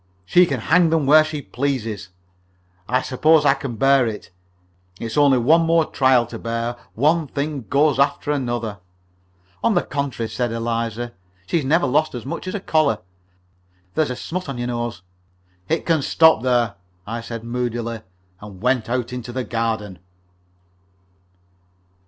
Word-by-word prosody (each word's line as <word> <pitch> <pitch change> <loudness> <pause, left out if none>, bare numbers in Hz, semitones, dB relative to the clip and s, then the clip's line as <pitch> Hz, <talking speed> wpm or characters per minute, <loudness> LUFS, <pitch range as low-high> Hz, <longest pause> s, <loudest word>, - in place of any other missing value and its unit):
"She 175 - +5
can 135 -6 -2
hang 170 +6 +4
them 160 -3 +1
where 155 +3 +7
she 155 -2 -5
pleases. 115 -8 -3 0.8
I 125 +1 +1
suppose 155 +4 +3
I 135 - +6
can 135 -3 -6
bear 135 +2 +4
it. 105 -3 -6 0.7
It's 115 -1 -5
only 145 -3 +5
one 155 +8 +4
more 165 -1 +3
trial 130 -3 +3
to 115 0 -8
bear. 115 +1 -3 0.2
One 155 +5 +2
thing 140 -2 -4
goes 145 0 +3
after 140 +1 +1
another." 120 -7 -2 0.8
"On 230 - +3
the 175 - +2
contrary," 140 -5 -3
said 120 +1 -2
Eliza, 115 0 -3 0.3
"she's 165 - 0
never 160 +6 +2
lost 150 +2 +1
as 120 - -6
much 140 - -5
as 185 - -3
a - - -2
collar. 155 - +2 1.0
There's 155 -3 +1
a 125 - -3
smut 180 +4 -5
on 135 - -4
your 120 - -3
nose." 120 -6 -4 0.7
"It 160 +1 0
can 165 -3 +2
stop 160 -2 +4
there," 120 -5 +1 0.3
I 115 +2 -4
said, 115 -1 -7
moodily, 120 -1 -3 0.4
and 100 -3 -11
went 125 +1 0
out 125 0 -2
into 125 -1 -6
the 130 +1 -3
garden. 110 -6 -3
125 Hz, 155 wpm, -21 LUFS, 115-150 Hz, 1.0 s, where